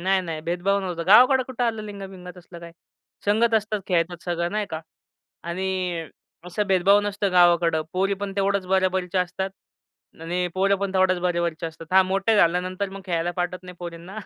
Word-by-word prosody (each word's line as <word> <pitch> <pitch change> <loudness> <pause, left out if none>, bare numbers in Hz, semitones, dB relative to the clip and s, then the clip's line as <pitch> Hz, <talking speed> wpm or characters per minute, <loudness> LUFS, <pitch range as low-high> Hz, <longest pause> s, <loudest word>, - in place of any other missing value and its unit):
नाही-नाही, 180 -4 0
भेदभाव 180 +4 0
नव्हता. 175 -3 -4
गावाकडं 255 +6 +7
कुठं 250 -1 -2
आलं 225 -2 -1
लिंग-बिंग 195 -3 -9
असलं 175 -1 -12
काय, 170 0 -10 0.5
संगत 225 +3 +3
असतात, 215 -1 0
खेळतात 175 -1 0
सगळं 170 -1 -1
नाही 210 -1 -1
का 160 0 -4 0.6
आणि 180 -1 -3 0.4
असं 205 +4 -2
भेदभाव 195 +1 +4
नसतं 205 -1 -1
गावाकडं. 170 -2 +4
पोरी 195 +2 +1
पण 200 0 -5
तेवढ्याच 195 -1 0
बरोबरीच्या 185 -1 +1
असतात 190 +2 -4 0.7
आणि 175 +2 -2
पोरं 195 +1 +2
पण 195 0 -3
तेवढ्याच 185 -1 +3
बरोबरीचे 170 -2 -1
असतात. 160 0 -10
हां, 190 0 +6
मोठे 195 +4 +1
झाल्यानंतर 185 +2 +1
मग 195 0 -8
खेळायला 170 -1 -1
पाठवत 180 0 -2
नाही 180 0 -10
पोरींना. 175 +4 -8
185 Hz, 165 wpm, -24 LUFS, 175-200 Hz, 0.7 s, गावाकडं